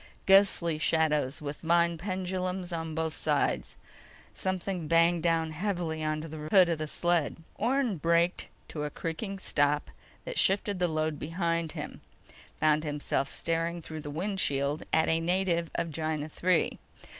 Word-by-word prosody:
Ghostly 190 -5 +5
shadows 150 -3 +1
with 145 0 -5
vine 170 +1 +3
pendulums 185 -1 -3
on 165 -1 -4
both 160 -1 -1
sides. - - 0 0.6
Something 185 -3 -2
banged 165 +1 +4
down 165 -1 +1
heavily 165 -2 -2
onto 155 +1 -2
the 155 -1 -7
hood 185 -2 +6
of 165 -2 -1
the 155 - -3
sled. 170 -1 +1 0.2
Orne 250 -5 0
braked 170 +3 +1 0.2
to 150 - -4
a 150 - -2
creaking 180 +7 -4
stop 145 -5 +1 0.3
that - - -2
shifted 200 0 +2
the 180 - +2
load 155 -2 -1
behind 165 0 -1
him, - - -7 0.6
found 155 0 +3
himself 145 -2 -1
staring 165 +1 -1
through 160 -1 -7
the 145 - -7
windshield 150 -4 -1
at 160 - +3
a 160 - +2
native 170 -1 0
of 165 - -1
Gienah 155 0 -3
III. 180 -2 +2
165 Hz, 145 wpm, -29 LUFS, 155-180 Hz, 0.6 s, hood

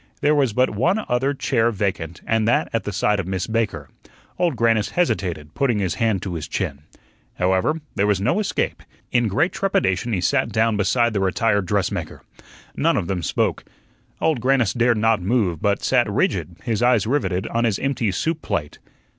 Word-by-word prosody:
There 150 - +3
was 140 -5 +2
but 125 +4 +2
one 175 - 0
other 125 +3 +1
chair 120 -4 +1
vacant, 95 -6 -3
and 110 -1 +1
that 120 - +2
at 115 - -1
the 105 - -2
side 105 +1 +1
of 95 - -3
Miss 95 -1 -2
Baker. 110 -10 -2 0.5
Old 175 -5 +1
Grannis 115 -2 +2
hesitated, 90 - -1
putting 125 -5 +1
his 95 -4 0
hand 110 -5 0
to 95 - -4
his 80 -3 -5
chin. 70 +1 -3 0.5
However, 95 - +1
there 100 - +1
was 105 -2 +2
no 140 - +1
escape. 210 - -2 0.3
In 120 -2 +2
great 140 - +1
trepidation 120 - 0
he 100 - 0
sat 90 - +1
down 110 0 +2
beside 115 +3 +2
the 100 - 0
retired 100 +1 +1
dressmaker. 100 0 -2 0.5
Neither - - +2
of - - -1
them 90 0 -2
spoke. 80 - -1 0.6
Old 155 -7 +1
Grannis 130 -4 +2
dared 120 -1 +2
not 110 -2 +2
move, 95 -5 0
but 100 -1 0
sat 125 -4 +2
rigid, 90 -4 -1
his 115 -2 -1
eyes 120 -4 +3
riveted 100 -7 0
on 115 +1 0
his 105 -4 +1
empty 130 -6 -1
soup 160 - -2
plate. 75 -2 -3
110 Hz, 185 wpm, -22 LUFS, 95-125 Hz, 0.6 s, There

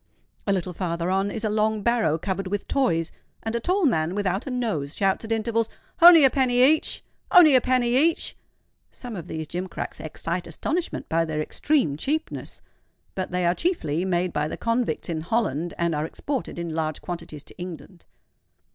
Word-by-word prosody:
A - - +3
little 185 -2 -1
farther 170 0 -2
on 195 +1 +1
is 220 +2 -5
a 215 - +1
long 215 0 +1
barrow 230 -10 +2
covered 190 +2 -3
with 205 +1 -3
toys; 170 -12 +1 0.3
and 225 +1 -2
a - - +1
tall 365 - +1
man 170 - +1
without 200 +2 -1
a - - -2
nose, 215 - -2
shouts 195 +1 +1
at 220 - -7
intervals, 225 0 0 0.3
"Only 335 -2 +10
a 270 - +6
penny 250 -2 +3
each! 305 +4 +3 0.3
only 345 -6 +8
a 255 - +6
penny 250 -1 +2
each!" 315 +5 +2 0.5
Some 245 -3 -8
of 175 -3 -7
these 160 -2 -4
gimcracks 180 +4 -5
excite 170 +3 -4
astonishment 325 - -3
by 165 +1 +2
their 155 -2 -3
extreme 200 - 0
cheapness; 310 - -3 0.5
but 185 -1 -3
they 180 0 -1
are 175 - +3
chiefly 180 - -1
made 180 -1 0
by 150 0 0
the - - -5
convicts 230 -7 -1
in 160 -2 -2
Holland, 175 - -1
and 170 -1 0
are 150 +1 -1
exported 275 - -4
in 170 -1 -4
large 155 -1 -2
quantities 170 -4 -7
to - - -13
England. 180 0 -9
195 Hz, 180 wpm, -25 LUFS, 165-245 Hz, 0.5 s, Only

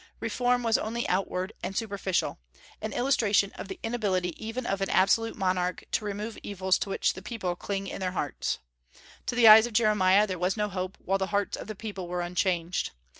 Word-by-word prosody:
Reform 245 +2 +1
was 225 -1 +3
only 235 +2 -2
outward 185 +1 -1
and 195 - -4
superficial, 200 - -1 0.4
an 215 - -3
illustration 215 -5 +2
of - - -8
the 190 - -7
inability 205 -6 0
even 230 +3 -4
of 195 -2 -1
an 195 - 0
absolute 225 +4 +3
monarch 185 -2 -1
to 215 - 0
remove 210 +2 -4
evils 190 -2 0
to - - -3
which - - +1
the 190 - -9
people 190 -7 -3
cling 195 +2 -3
in - - -6
their 185 -1 -2
hearts. 145 -7 -2 0.7
To - - -1
the 240 -2 +6
eyes 220 +2 +10
of 240 - -9
Jeremiah, 210 -3 +4
there 185 -4 -4
was 180 +4 0
no 210 0 0
hope 185 0 -4
while 195 +1 -1
the 190 - 0
hearts 205 0 0
of - - -8
the 215 - -5
people 200 -4 -6
were 175 0 -2
unchanged. 175 0 -1
200 Hz, 200 wpm, -28 LUFS, 185-220 Hz, 0.7 s, eyes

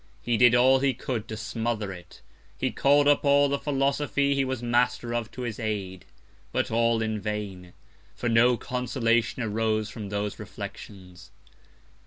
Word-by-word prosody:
He 120 - +1
did 120 +1 +6
all 130 +2 +5
he 135 -2 +1
could 120 -3 -4
to 110 - -6
smother 110 -2 -3
it; 90 -1 -14 0.3
he - - -1
call'd 145 +1 +3
up 145 -1 +4
all 140 0 +4
the 140 0 -1
Philosophy 140 0 0
he 140 -1 +1
was 130 -2 -3
Master 120 0 +1
of 120 -2 -2
to 125 - -7
his 115 -3 -4
Aid; 100 -5 -4 0.5
but - - -1
all 115 0 +2
in 110 -1 -2
vain, 100 -4 -5 0.4
for 120 - -3
no 120 +1 +4
Consolation 125 -1 0
arose 110 0 -1
from 105 -3 -7
those 105 0 -3
Reflections. 90 -3 -10
115 Hz, 160 wpm, -26 LUFS, 105-130 Hz, 0.5 s, did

